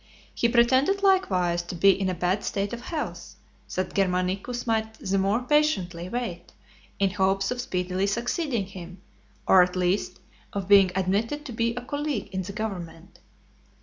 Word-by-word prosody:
He 235 - +1
pretended 260 +11 +3
likewise 185 - +2
to 175 +1 -7
be 195 +3 +6
in 195 0 -1
a 185 - -2
bad 180 +3 0
state 200 +1 -2
of 235 - -5
health, 310 +4 -5 0.4
that 185 - -2
Germanicus 190 +5 -1
might 220 -1 -1
the 195 -2 -1
more 200 +5 +1
patiently 190 - +1
wait 235 -6 -5 0.4
in 195 -1 +1
hopes 195 +1 +1
of 250 0 -2
speedily 185 -3 -1
succeeding 235 - -1
him, 185 -1 -10 0.5
or 190 - +7
at 180 0 +1
least 180 0 0 0.3
of 200 -2 -3
being 200 -1 +7
(210) 185 +1 -1 0.2
admitted 295 +3 -6
to 265 - -6
be 230 +1 0
a 245 - -4
colleague 290 +1 -3
in 190 -1 -2
the 185 - -6
government. 190 -5 -6
195 Hz, 165 wpm, -26 LUFS, 185-240 Hz, 0.5 s, or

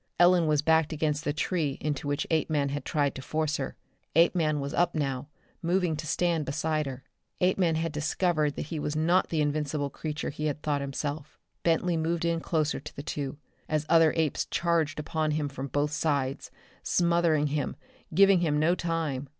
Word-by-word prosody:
Ellen 175 -1 +5
was 150 -1 +2
backed 160 0 +3
against 150 0 -1
the 145 - +1
tree 150 -2 -1
into 145 -1 -3
which 145 0 -1
Apeman 155 -3 +1
had 145 +1 -3
tried 145 -2 +1
to 135 - -7
force 155 +2 -1
her. 135 - -4 0.4
Apeman 165 -2 +3
was 140 +1 -4
up 175 0 +2
now, 135 -3 -2 0.3
moving 175 -1 +1
to 155 +1 -6
stand 170 0 +1
beside 155 +1 -1
her. 130 -1 -7 0.4
Apeman 180 -2 +2
had 165 0 -1
discovered 150 0 0
that - - -4
he 155 - -2
was 150 0 -2
not 170 +4 +2
the 160 -2 0
invincible 145 -1 -1
creature 150 +1 -4
he 150 +2 -3
had 150 0 -3
thought 145 -2 0
himself. 145 +2 -4 0.2
Bentley 170 +1 +1
moved 165 +1 0
in 170 0 +1
closer 155 -2 0
to - - -10
the 140 - -6
two, 140 -2 -4 0.3
as 155 -1 0
other 165 -1 +6
apes 160 -3 0
charged 165 -4 0
upon 155 +1 -1
him 150 -2 -1
from 135 -1 -5
both 145 +2 0
sides, 145 -3 -1 0.3
smothering 170 -3 +2
him, 150 -2 -1 0.4
giving 195 +2 +6
him 155 -4 +1
no 155 +3 +3
time. 160 -6 -2
155 Hz, 185 wpm, -28 LUFS, 145-165 Hz, 0.4 s, other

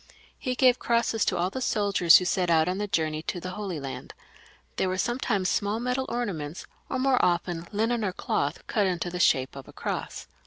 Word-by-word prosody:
He 255 -2 -2
gave 250 -1 +4
crosses 230 -2 +1
to - - 0
all 180 +2 0
the 260 - -4
soldiers 200 -8 +5
who 180 - -1
set 180 -1 0
out 160 -1 +4
on 185 +2 -1
the 210 - -2
journey 155 -4 -1
to 175 - -4
the 185 +1 -6
Holy 190 -5 -4
Land; 135 -1 -7 0.6
they - - +1
were 185 0 -1
sometimes 225 -3 0
small 205 +4 0
metal 250 +2 -1
ornaments, 180 -10 -4 0.2
or 260 - -1
more 260 0 +2
often 175 -1 0
linen 225 +2 0
or 195 - 0
cloth 145 -3 -2
cut 205 -3 +1
into 175 -1 -2
the 180 - -4
shape 130 -6 +2
of 135 - -9
a - - -13
cross. - - -4
185 Hz, 205 wpm, -27 LUFS, 170-230 Hz, 0.6 s, soldiers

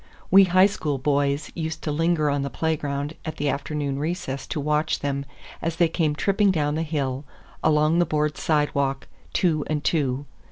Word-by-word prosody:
We 195 +1 +8
High 185 +1 +5
School 155 -8 -1
boys 140 +1 0
used 160 -1 -4
to 155 - -1
linger 155 -1 +1
on 140 0 0
the 140 - -2
playground 145 -1 -2
at 155 - -5
the 145 0 0
afternoon 140 -1 -2
recess 150 -4 -3
to 160 - -3
watch 150 +2 0
them 140 -1 -2 0.4
as 165 0 -2
they 170 0 +4
came 160 -3 0
tripping 200 +5 +2
down 150 -5 +1
the 155 - -1
hill 140 -4 -2 0.4
along 155 +2 +3
the 175 - +4
board 150 -1 0
sidewalk, 140 -3 0 0.2
two 160 -5 +1
and 150 -1 -1
two. 140 -4 0
150 Hz, 175 wpm, -24 LUFS, 140-160 Hz, 0.4 s, We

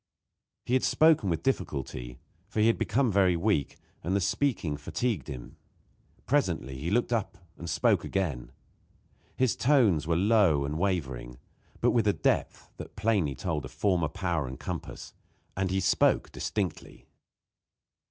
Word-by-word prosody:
He 125 - -2
had 130 - +3
spoken 155 - +4
with 85 - -1
difficulty, 65 - -3 0.3
for 105 +1 -4
he 105 - +4
had 115 - +3
become 125 0 +1
very 95 -2 +3
weak, 85 -6 0 0.3
and 90 +4 0
the - - +3
speaking 100 - 0
fatigued 110 +10 -2
him. 65 -5 -8 0.7
Presently 65 +2 0
he 80 +5 -3
looked 120 +4 +1
up 110 -5 -2 0.2
and 85 - -7
spoke - - +2
again. 80 -11 -2 0.8
His 130 -3 +1
tones 115 - +3
were 85 - +2
low 95 -7 +3
and 75 +3 -3
wavering, 65 -11 -2 0.4
but - - +4
with 115 -3 +2
a 100 - +4
depth - - -1
that - - -9
plainly 100 -9 +1
told 75 +1 -3
of - - -8
former 90 -5 +1
power 85 -5 -2
and 65 +3 -8
compass; 85 -7 -6 0.4
and 95 0 -1
he 95 +1 0
spoke 95 - +2
distinctly. 95 -7 -4
90 Hz, 150 wpm, -28 LUFS, 75-105 Hz, 0.8 s, spoken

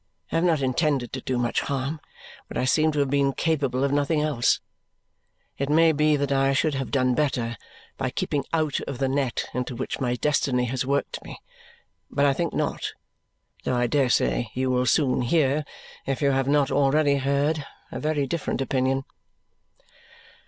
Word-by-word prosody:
I - - -2
have 165 - +1
not 160 -5 +2
intended 135 -1 0
to 130 - -4
do 130 0 -2
much 120 -1 0
harm, 140 +2 -3 0.5
but - - -6
I - - +1
seem 155 +4 +3
to 150 - -1
have 135 -1 0
been 140 -1 +2
capable 140 -4 0
of 140 - +1
nothing 145 +2 +1
else. 150 -6 +2 1.0
It 140 0 -1
may 160 +2 +5
be 150 0 +3
that 140 -1 -1
I 135 0 +3
should 150 +2 +1
have 135 -1 -3
done 130 -2 +2
better 120 -4 0 0.4
by - - -1
keeping 140 -2 -2
out 155 -4 0
of 140 - -4
the 135 +1 0
net 135 -2 -1
into 125 0 -3
which 130 - -4
my 125 -2 0
destiny 125 -2 +1
has 125 +1 -2
worked 140 +1 -1
me, - - -9 0.7
but 140 0 +1
I 140 - +4
think 170 +4 -1
not, - - -2 0.7
though 125 - 0
I 120 0 +2
dare 130 +2 +2
say 120 - +1
you 130 0 0
will 125 0 +1
soon 130 0 +2
hear, 145 +2 +2 0.4
if 135 -1 -1
you 140 -2 +2
have 135 0 +1
not 145 -1 +2
already 140 +1 +3
heard, 140 +3 0 0.3
a - - -5
very 150 -2 0
different 155 +3 -2
opinion. 135 0 0
140 Hz, 180 wpm, -25 LUFS, 130-150 Hz, 1.0 s, may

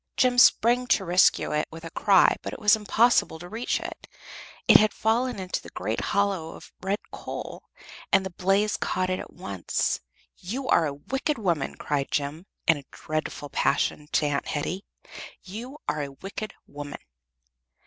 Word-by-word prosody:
Jem 250 -1 +4
sprang 245 +1 +5
to 195 - +2
rescue 180 -1 +4
it 150 0 0
with 160 0 -10
a 165 - -7
cry, 195 0 +5
but - - -5
it - - -7
was 210 -1 +6
impossible 220 -3 +3
to 175 +2 -9
reach 225 +6 -1
it; - - -8 0.6
it - - +10
had 215 0 +2
fallen 235 +2 +1
into 185 -1 -3
a - - -10
great - - -3
hollow 195 -5 0
of - - -14
red 195 +2 0
coal, - - -7 0.5
and 195 0 +4
the 190 - -4
blaze 195 +4 +1
caught 185 0 -1
it 185 - -1
at - - -8
once. 100 - -2 0.4
"You 250 +9 -5
are 165 - +4
a 145 - -3
wicked 270 - -2
woman!" 170 -10 -1
cried 140 -2 -2
Jem, 150 +6 -2 0.2
in 160 - +5
a 140 - -10
dreadful 155 -1 -4
passion, 145 +1 +1
to 150 - +3
Aunt 145 -1 -1
Hetty. 180 +6 -2 0.6
"You 235 +9 -8
are 150 - 0
a 140 - -4
wicked 195 +7 -7
woman." 145 0 -7
185 Hz, 170 wpm, -26 LUFS, 155-215 Hz, 0.6 s, it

